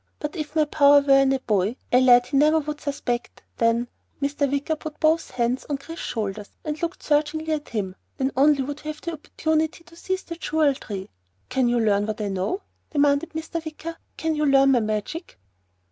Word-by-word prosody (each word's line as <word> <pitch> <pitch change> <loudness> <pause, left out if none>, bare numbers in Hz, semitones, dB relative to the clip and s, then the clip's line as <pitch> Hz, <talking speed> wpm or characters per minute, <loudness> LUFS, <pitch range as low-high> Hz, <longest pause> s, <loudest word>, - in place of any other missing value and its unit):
But 300 +2 -4
if 305 -2 -5
my 310 -1 +4
power 285 -1 +6
were 275 -1 +5
in 270 0 +4
a 270 - +2
boy 210 -2 0 0.2
a 250 - +5
lad 245 -1 +6
he 255 - -4
never 305 +3 +5
would 300 -1 -3
suspect 245 -4 -3
then 230 +1 +2 0.2
" - - -42
Mr. 285 0 0
Wicker 285 +3 0
put 305 0 -8
both 320 +1 +2
hands 245 +1 -1
on 285 - 0
Chris's 330 +4 -8
shoulders 210 -2 -3 0.2
and 305 +1 -3
looked 340 +1 -3
searchingly 310 +1 +1
at 300 -1 -4
him 195 -5 -3 0.2
"then 265 0 0
only 280 +1 +4
would 290 +2 -6
we 305 - -5
have 305 - -18
an 335 - -1
opportunity 315 +1 -1
to 335 - -18
seize 375 +2 -3
the 335 - -7
Jewel 310 -3 +2
Tree. 200 -7 -7 0.4
Can 255 -1 +2
you 240 0 +2
learn 205 -2 +2
what 215 0 -3
I 210 -1 -2
know?" 195 - -2 0.3
demanded 290 +2 +2
Mr. 320 +1 -4
Wicker. 320 +1 -6 0.2
"Can 320 0 0
you 300 -1 +1
learn 275 0 +5
my 250 - +4
magic?" 215 - -3
285 Hz, 205 wpm, -24 LUFS, 245-315 Hz, 0.4 s, power